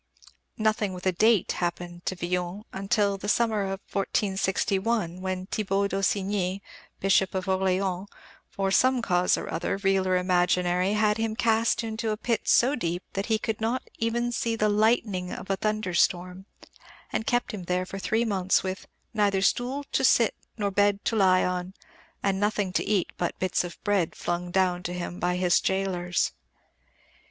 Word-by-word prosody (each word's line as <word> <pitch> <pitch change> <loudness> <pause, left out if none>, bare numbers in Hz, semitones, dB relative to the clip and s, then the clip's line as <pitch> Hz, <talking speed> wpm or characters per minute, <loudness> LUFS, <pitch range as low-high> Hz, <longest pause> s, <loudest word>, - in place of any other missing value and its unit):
Nothing 215 -2 +1
with 180 0 -8
a 185 - +4
date 215 +3 +3
happened 175 0 -4
to 185 - 0
Villon 180 +3 -3 0.3
till 200 -2 +2
the 205 - -4
summer 220 -2 +2
of 195 0 -4
1461, 195 -1 0
when 185 -1 -3
Thibault 200 -1 0
d'Aussigny, 195 0 -1 0.4
Bishop 195 0 +2
of 185 -1 -1
Orléans, 190 0 0 0.4
for 195 -1 -1
some 255 +3 +3
cause 180 -3 +2
or - - -5
other, 170 - -1
real 195 -1 +1
or 185 0 +3
imaginary, 180 +1 +2
had 210 0 +2
him 225 -1 -1
cast 230 0 +2
into 220 0 -3
a 215 - -1
pit 230 +1 -2
so 255 +4 +4
deep 175 -8 -2
that 195 +1 -2
he 220 -1 +2
"could 220 0 -3
not 235 +4 0 0.2
even 235 +1 0
see 230 -1 -1
the 215 -1 +1
lightning 210 -4 +1
of 195 - -5
a - - +2
thunderstorm," 185 -2 0 0.7
and 220 - -2
kept 245 0 +1
him 190 -4 -6
there 180 +1 0
for 195 +1 -7
three 220 +4 0
months 190 -4 +1
with 185 0 -5 0.3
"neither 200 -3 +2
stool 255 +7 +1
to - - +1
sit - - +4 0.2
nor 205 -2 -1
bed 205 0 +2
to 225 - +1
lie 185 -3 +4
on, 180 +1 -3 0.5
and 195 -1 +1
nothing 205 -2 0
to - - +1
eat 200 -4 0
but 175 - -2
bits 185 -1 0
of 175 -1 -7
bread 200 -6 +1
flung 175 0 -3
down 180 -1 +1
to 175 - -4
him 175 0 -5
by 180 0 0
his 180 -1 +3
gaolers." 180 -2 0
195 Hz, 170 wpm, -27 LUFS, 180-215 Hz, 0.7 s, a